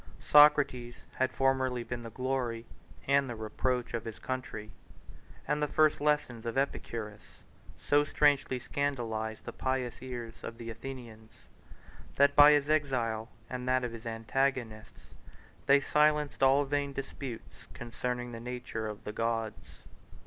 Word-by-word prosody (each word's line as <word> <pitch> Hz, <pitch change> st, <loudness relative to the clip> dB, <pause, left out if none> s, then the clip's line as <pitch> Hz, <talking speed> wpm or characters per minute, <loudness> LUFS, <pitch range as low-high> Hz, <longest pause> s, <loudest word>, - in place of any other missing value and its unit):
Socrates 145 Hz, -5 st, +5 dB, 0.2 s
had 130 Hz, 0 st, +1 dB
formerly 130 Hz, -2 st, +1 dB
been 120 Hz, +1 st, -5 dB
the 115 Hz, -, -7 dB
glory 125 Hz, -1 st, -2 dB, 0.4 s
and 140 Hz, -1 st, +3 dB
the 120 Hz, -, -4 dB
reproach 120 Hz, +3 st, -2 dB
of 115 Hz, -1 st, -2 dB
his 115 Hz, -2 st, -7 dB
country; 125 Hz, -5 st, -5 dB, 0.8 s
and 150 Hz, 0 st, 0 dB
the 150 Hz, -, +2 dB
first 155 Hz, 0 st, +3 dB
lessons 145 Hz, -6 st, 0 dB
of 115 Hz, -, -3 dB
Epicurus 115 Hz, -6 st, -4 dB, 0.4 s
so 145 Hz, 0 st, +3 dB
strangely 145 Hz, -3 st, +2 dB
scandalized 115 Hz, -5 st, -3 dB
the -, -, -6 dB
pious 130 Hz, -2 st, -2 dB
ears 120 Hz, -3 st, -6 dB
of 115 Hz, -, -7 dB
the 115 Hz, -1 st, -6 dB
Athenians, 115 Hz, -3 st, -10 dB, 0.7 s
that 140 Hz, 0 st, +4 dB
by 145 Hz, +1 st, +9 dB
his 145 Hz, -1 st, +2 dB
exile, 125 Hz, -7 st, 0 dB, 0.2 s
and 125 Hz, 0 st, -4 dB
that 130 Hz, 0 st, +2 dB
of 120 Hz, -, -2 dB
his 115 Hz, 0 st, -8 dB
antagonists, 115 Hz, -1 st, -2 dB, 0.5 s
they 140 Hz, +1 st, +7 dB
silenced 150 Hz, 0 st, +2 dB
all 135 Hz, +2 st, +5 dB
vain 140 Hz, 0 st, -1 dB
disputes 135 Hz, -3 st, -7 dB
concerning 125 Hz, +1 st, -4 dB
the 115 Hz, -, -7 dB
nature 120 Hz, -2 st, -5 dB
of 105 Hz, -1 st, -7 dB
the 105 Hz, -, -6 dB
gods. 115 Hz, -1 st, -3 dB
125 Hz, 140 wpm, -31 LUFS, 115-140 Hz, 0.8 s, by